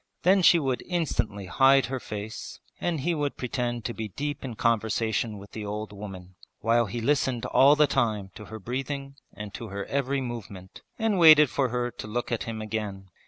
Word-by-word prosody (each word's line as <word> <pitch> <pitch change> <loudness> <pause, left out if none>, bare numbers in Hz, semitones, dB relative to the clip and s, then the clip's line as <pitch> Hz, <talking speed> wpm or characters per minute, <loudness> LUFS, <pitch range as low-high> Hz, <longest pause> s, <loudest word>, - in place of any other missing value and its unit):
Then 190 +2 +5
she 175 - +7
would 135 -5 -1
instantly 140 - -1
hide 135 +8 +5
her 130 0 -3
face 105 -1 -7 0.2
and 165 -5 -1
he 175 +5 +1
would 145 -3 -2
pretend 120 -2 -3
to 120 - -2
be 110 -1 -4
deep 145 +8 -4
in 125 -4 -5
conversation 110 -1 0
with 100 +1 -12
the 110 - -6
old 105 +1 -5
woman, 95 -3 -9 0.3
while 115 +1 +2
he 120 +5 -4
listened 130 -1 +1
all 140 +2 +6
the 150 0 +5
time 110 -8 0
to 105 - -10
her 110 - -8
breathing 135 +5 -5
and 105 0 -8
to 115 - -6
her 100 0 -5
every 140 0 -1
movement 105 -7 -7 0.2
and 220 -4 +1
waited 155 -4 +8
for 135 -3 +1
her 120 0 -1
to 110 - -8
look 120 +3 -3
at 115 - -1
him 110 -1 -5
again. 105 -3 -5
120 Hz, 195 wpm, -27 LUFS, 105-140 Hz, 0.3 s, waited